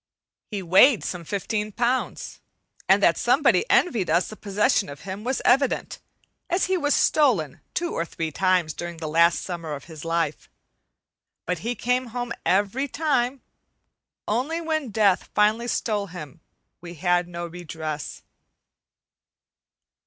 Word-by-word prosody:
He 205 -3 -4
weighed 195 +8 +5
some 180 -2 -4
fifteen 210 +4 -3
pounds, 245 +4 -2 0.5
and - - +5
that - - +4
somebody 470 - +3
envied 225 - +2
us 170 +3 +2
the 215 - -8
possession 210 +1 +1
of 140 +1 -9
him 195 +2 -7
was 260 +2 -2
evident, 265 +2 +2 0.5
as 355 +2 +1
he 375 - +1
was 295 -5 +1
stolen 215 - +2
two 345 0 -1
or 165 - -1
three 165 -1 -4
times 180 -2 +1
during 175 +1 -6
the 160 -1 -5
last 170 +2 +3
summer 165 -4 -5
of 140 - -7
his 160 -3 -11
life. 165 -3 -2 1.0
But 180 -1 -2
he 235 +7 -3
came 250 +1 0
home 245 0 -4
every 205 +9 +1
time; 275 -3 -1 0.8
only 260 +10 -1
when 315 -5 -2
Death 205 -3 +2
finally 215 +3 +3
stole 210 -4 -1
him, 170 -4 -10 0.4
we 175 0 -9
had 175 +2 +1
no 175 0 -5
redress. 160 -3 -6
200 Hz, 140 wpm, -24 LUFS, 170-245 Hz, 1.0 s, weighed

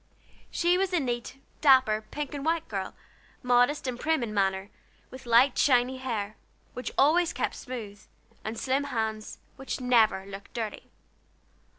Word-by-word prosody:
She 350 +1 +2
was 380 -1 0
a 350 - +3
neat, 245 -1 -3 0.2
dapper, 260 -7 +5
pink 295 -1 -5
and 285 -1 -5
white 325 +1 0
girl, 195 -3 -4 0.5
modest 245 +4 +3
and 250 -2 -3
prim 315 -3 +1
in 215 -2 -4
manner, 195 -1 0 0.4
with 260 -1 -11
light 240 +3 +5
shiny 255 -1 +3
hair, 220 -5 -4 0.4
which 250 - -5
always 330 +5 +4
kept - - -2
smooth, 215 -5 -8 0.4
and 220 +1 -5
slim 270 +3 0
hands, 220 -5 -3 0.2
which 270 +1 -5
never 230 -6 +3
looked 200 +3 -10
dirty. 220 -3 -5
250 Hz, 150 wpm, -28 LUFS, 215-275 Hz, 0.5 s, dapper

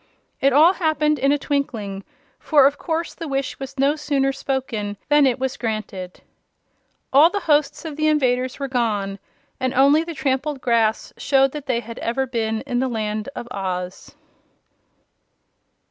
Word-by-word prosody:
It 275 - +3
all 310 +7 +6
happened 305 -4 +1
in 275 +2 +3
a 290 - +3
twinkling, 225 -10 -3 0.4
for 290 -4 +4
of 285 +1 +2
course 330 0 -2
the 330 - -7
wish 275 -1 -3
was 270 +1 -8
no 275 +2 +3
sooner 280 -3 0
spoken 260 -7 -3
than 295 -1 +5
it 250 - +1
was 265 +1 -3
granted. 215 -5 -5 0.9
All 295 +5 +7
the 405 +3 -3
hosts 295 0 +1
of 305 -2 -6
the 310 0 +1
invaders 255 -4 +1
were 275 - -3
gone, 210 -6 -1 0.4
and 260 0 -1
only 280 +4 +5
the 335 -1 -7
trampled 270 +1 -1
grass 230 -3 +1
showed 270 -1 +3
that 290 -1 -8
they 240 -2 0
had 230 0 -9
ever 250 +3 -1
been 225 -3 -2
in 250 -2 -2
the 260 - +1
Land 215 -1 -3
of 240 - -6
Oz. 185 -2 -5
270 Hz, 160 wpm, -22 LUFS, 230-290 Hz, 0.9 s, All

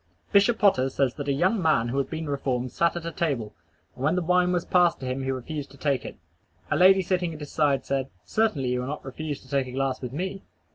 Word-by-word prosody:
Bishop 210 +3 +4
Potter 135 -12 +3
says 130 -2 0
that 145 0 -6
a - - +2
young 185 +9 +2
man 155 -8 +2
who 135 +3 -1
had 135 - -1
been 160 -1 -4
reformed 130 -3 -2
sat 170 -1 +1
at 170 -1 -5
a 170 - -3
table, 135 -12 -2 0.4
and 125 - -8
when 155 +5 +2
the 180 - 0
wine 180 +1 +3
was 175 -1 0
passed 175 -2 +3
to - - -5
him 130 +1 -2
refused 135 +3 -4
to 140 - -16
take 140 -3 0
it. - - -8 0.5
A - - +3
lady 190 +1 +6
sitting 175 -2 -1
at - - -10
his 145 -2 -8
side 145 -3 +1
said, 135 -1 -1 0.2
"Certainly 210 - +1
you 125 0 0
will 125 - -3
not 150 0 -5
refuse 145 +2 -5
to - - -18
take 135 -1 0
a - - -7
glass 135 -1 -1
with 125 -2 -5
me?" 190 +6 -4
145 Hz, 250 wpm, -26 LUFS, 130-175 Hz, 0.5 s, lady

